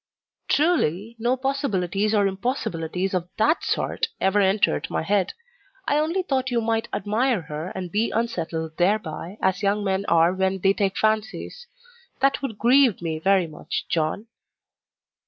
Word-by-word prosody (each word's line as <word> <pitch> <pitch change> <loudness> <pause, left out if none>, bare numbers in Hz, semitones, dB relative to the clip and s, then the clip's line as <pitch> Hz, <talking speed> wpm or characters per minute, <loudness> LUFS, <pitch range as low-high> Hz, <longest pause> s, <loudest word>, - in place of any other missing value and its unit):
"Truly, 230 - +1
no 240 +3 +1
possibilities 215 - 0
or 205 -1 +3
impossibilities 190 - -2
of 180 -1 -2
THAT 300 +10 +2
sort 455 - -1
ever 195 +2 +2
entered 195 +1 +2
my - - -1
head. 195 +1 +1 0.5
I 290 - +3
only 335 +5 0
thought 260 -6 -1
you 240 -2 +1
might 225 0 0
admire 225 +1 0
her, 150 +1 -6
and 180 -2 -5
be 220 +3 +1
unsettled 165 -8 -3
thereby 185 0 -1
as 190 +1 +1
young 205 +1 +1
men 195 0 0
are 170 +1 +4
when 190 0 0
they 195 +1 +4
take 200 -1 -1
fancies. 220 - -1 0.5
That 275 +1 +2
would 250 -7 -4
grieve 250 -1 +4
me 160 -2 -3
very 190 +1 +3
much, 155 -2 -5
John." 165 +5 -1
200 Hz, 150 wpm, -24 LUFS, 180-240 Hz, 0.5 s, are